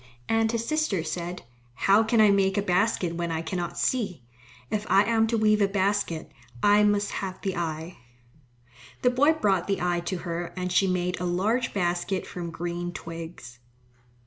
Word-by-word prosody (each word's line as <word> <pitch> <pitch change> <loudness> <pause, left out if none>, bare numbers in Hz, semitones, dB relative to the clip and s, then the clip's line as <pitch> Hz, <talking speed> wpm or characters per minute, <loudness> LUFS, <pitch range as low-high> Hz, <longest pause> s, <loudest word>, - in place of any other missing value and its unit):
And 225 0 +2
his 230 0 -2
sister 310 - 0
said, 175 +2 -5 0.3
"How 200 - +4
can 225 +1 +1
I 210 -2 +7
make 195 -1 +2
a 200 - +1
basket 185 -2 +1
when 170 0 -3
I 160 0 -2
cannot 175 +1 -4
see? 200 - -1 0.5
If 210 0 -2
I 195 - +6
am 225 0 +2
to 230 0 0
weave 215 -1 +3
a 200 - +4
basket, 195 -5 -1 0.3
I 205 0 +6
must 205 0 +2
have 190 -1 -4
the 195 -2 -2
eye." 165 0 -4 1.0
The 250 - +4
boy 285 +5 +4
brought 195 - +1
the 195 -1 0
eye 175 -1 0
to 185 +1 -2
her 170 0 -4
and 180 0 -2
she 190 +2 +3
made 180 0 -1
a - - -1
large 210 +8 0
basket 180 0 -1
from 175 -1 -6
green 175 +1 -4
twigs. 165 -8 -8
190 Hz, 175 wpm, -26 LUFS, 175-210 Hz, 1.0 s, I